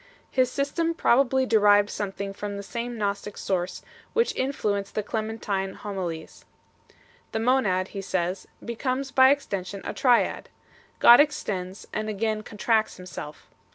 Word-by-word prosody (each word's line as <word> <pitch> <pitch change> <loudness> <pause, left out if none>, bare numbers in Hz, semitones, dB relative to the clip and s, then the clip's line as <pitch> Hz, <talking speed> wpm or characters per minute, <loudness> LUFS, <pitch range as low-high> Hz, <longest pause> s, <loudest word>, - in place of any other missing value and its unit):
His 255 -1 +3
system 325 +5 -1
pro 270 -4 +4
bably 265 0 0
derived 205 -2 +5
something 200 -1 -4
from 205 0 -5
the 200 - -6
same 235 +3 -5
Gnostic 205 0 -3
source 180 -1 -2 0.3
which 465 +1 +1
influenced 205 -7 -1
the 215 - 0
Clementine 210 -3 -3
Homilies 180 -6 -6 0.5
2. - - -26 0.4
The 220 - 0
Monad, 210 -7 +2
he 200 - -5
says, 185 -1 -2 0.2
becomes 255 +3 -2
by 260 -1 +7
extension 200 -9 -2
a - - -3
Triad; 245 -3 +2 0.5
God 240 +1 +9
extends 205 -11 -1
and 215 0 -2
again 215 +1 -1
con 215 0 -11
tracts 220 0 +1
Himself. 180 -4 -9
215 Hz, 145 wpm, -26 LUFS, 195-255 Hz, 0.5 s, God